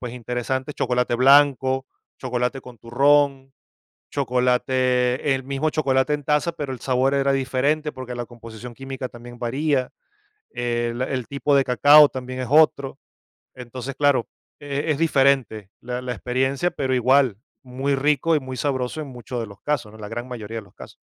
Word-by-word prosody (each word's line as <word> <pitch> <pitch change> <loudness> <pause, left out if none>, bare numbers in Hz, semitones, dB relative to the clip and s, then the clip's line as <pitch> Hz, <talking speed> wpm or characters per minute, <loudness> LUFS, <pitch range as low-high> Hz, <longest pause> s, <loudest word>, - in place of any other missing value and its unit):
pues, 125 -1 -6
interesantes, 125 +3 -3
chocolate 125 -1 0
blanco, 135 0 +4 0.3
chocolate 125 +1 -2
con 125 -3 -13
turrón, 135 +3 +2 0.6
chocolate 125 0 +1
el 130 - -5
mismo 140 +3 -1
chocolate 140 -1 +1
en 145 -1 -3
taza, 150 +4 +1
pero 145 -4 -5
el 130 - -6
sabor 130 +1 +1
era 140 0 +2
diferente 135 +4 0
porque 130 -2 -7
la 120 0 -4
composición 115 0 -11
química 135 0 -6
también 120 0 -12
varía. 130 +2 -1 0.6
El 120 0 -2
el 130 -2 -3
tipo 140 +1 0
de 135 -1 +4
cacao 145 +4 +7
también 130 -1 -6
es 125 - -4
otro. 145 -3 +3 0.6
Entonces, 125 +1 -7
claro, 140 -5 +2 0.3
e 145 +2 -2
es 145 - 0
diferente 135 - +2
la 125 +1 -4
la 125 -1 -4
experiencia, 130 +8 -1
pero 130 -2 -2
igual, 130 -2 +3 0.3
muy 135 +2 -2
rico 150 +3 +2
y - - +2
muy 130 -1 -7
sabroso 130 +1 -2
en 150 - -6
muchos 125 -1 -7
de 115 - -3
los 100 -1 -14
casos, 145 -8 -2
¿no?, 110 - -14
en - - -13
la 105 - -7
gran 120 +2 -5
mayoría 115 -3 -7
de 110 - -5
los 100 - -21
casos. - - -12
130 Hz, 170 wpm, -23 LUFS, 125-140 Hz, 0.6 s, cacao